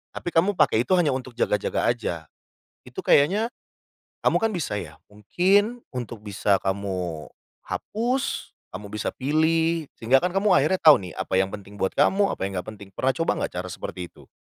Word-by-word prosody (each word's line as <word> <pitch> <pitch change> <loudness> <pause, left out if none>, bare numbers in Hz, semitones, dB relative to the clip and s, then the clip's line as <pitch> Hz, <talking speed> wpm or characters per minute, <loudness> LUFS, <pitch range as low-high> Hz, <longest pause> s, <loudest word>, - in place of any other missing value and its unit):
Tapi - - -4
kamu 180 +6 +3
pake 150 -9 +3
itu - - +2
hanya 170 -6 +3
untuk 130 -1 -4
jaga-jaga 105 -4 0
aja. 85 -9 -5 0.5
Itu - - -10
kayaknya 195 +11 +4 0.8
kamu - - +3
kan 225 -1 +1
bisa 160 - -2
ya, - - -7 0.2
mungkin 195 - +1
untuk 120 -3 -6
bisa 100 -1 +1
kamu 95 -5 -3 0.4
hapus, 245 +5 -2 0.2
kamu 100 +2 -6
bisa 105 -1 -2
pilih 160 +3 +1
sehingga 125 +4 +4
kan 180 - +1
kamu 200 +2 +2
akhirnya 180 +4 +3
tau 155 -2 +8
nih 90 -2 -8
apa 95 - -3
yang 95 0 +2
penting 100 0 -10
buat 95 - +1
kamu, 195 +7 +3
apa - - -8
yang 100 - -3
nggak - - -13
penting. 100 -1 -12
Pernah 130 +7 0
coba 165 - 0
nggak - - -2
cara 90 +1 -3
seperti 90 +1 -6
itu? - - -18
130 Hz, 180 wpm, -24 LUFS, -, 0.8 s, tau